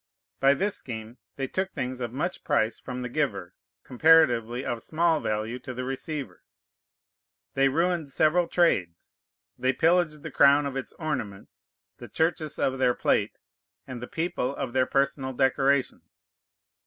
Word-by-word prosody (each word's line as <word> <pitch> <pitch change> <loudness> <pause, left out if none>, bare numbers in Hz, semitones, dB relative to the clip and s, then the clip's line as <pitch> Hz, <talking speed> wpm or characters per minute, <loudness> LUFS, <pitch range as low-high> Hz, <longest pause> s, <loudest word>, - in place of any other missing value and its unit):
By 135 +1 +5
this 200 +4 -1
scheme 115 0 -8 0.2
they 135 -1 -3
took 190 +6 -2
things 125 0 -4
of 120 -2 -4
much 160 +8 -3
price 115 -7 0
from 125 -1 -6
the 125 - -3
giver, 120 -10 -2 0.3
comparatively 125 -4 +3
of 120 -1 -3
small 165 +2 +1
value 110 +2 -3
to 130 0 -8
the 130 - -4
receiver; 135 - -5 1.1
they 135 0 +3
ruined 165 +1 0
several 160 +5 +2
trades; 95 - 0 0.5
they 130 +1 +1
pillaged 165 -2 +2
the 160 - -6
crown 140 +1 +5
of 140 -1 -4
its 135 - -5
ornaments, 130 - -5 0.4
the - - -11
churches 160 -2 -1
of 130 0 0
their 125 -2 +3
plate, 105 +1 0 0.5
and 125 -3 -8
the 125 - -6
people 160 -5 -2
of 130 -4 -4
their 130 -1 +2
personal 135 -1 0
decorations. 135 +1 0
135 Hz, 150 wpm, -26 LUFS, 125-155 Hz, 1.1 s, By